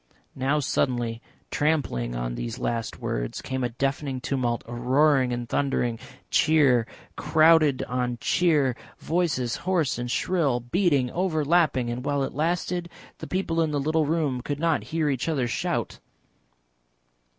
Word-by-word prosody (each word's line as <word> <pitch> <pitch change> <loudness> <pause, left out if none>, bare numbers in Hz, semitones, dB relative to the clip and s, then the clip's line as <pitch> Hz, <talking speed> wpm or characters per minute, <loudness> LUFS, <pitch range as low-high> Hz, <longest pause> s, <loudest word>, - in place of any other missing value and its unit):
Now 135 +3 0
suddenly, 120 -5 -1 0.3
trampling 135 - 0
on - - -3
these 115 - -5
last 115 -3 -3
words, - - -3
came 130 -1 -3
a 120 - 0
deafening 135 +2 -2
tumult, 125 -3 -1
a 120 - -8
roaring 130 +2 +3
and 120 -1 -3
thundering, 120 -3 0 0.3
cheer 140 -7 +4 0.3
crowded 155 -3 +4
on 125 -1 -2
cheer, 150 -7 +2 0.2
voices 155 -8 -1
hoarse 170 -9 0
and 120 0 -3
shrill, 145 -3 +1
beating, 135 0 +1
overlapping, 155 -7 +1
and 125 +1 -4
while 140 0 0
it - - -4
lasted 175 +3 -1 0.3
the - - -7
people 175 -3 -1
in 160 - +1
the 145 -1 -1
little 155 +2 +1
room 150 -6 0
could 145 +2 -4
not 165 -1 +1
hear 160 -1 -1
each 135 +2 -1
other 135 -6 0
shout. 120 - -2
135 Hz, 140 wpm, -25 LUFS, 120-160 Hz, 0.3 s, cheer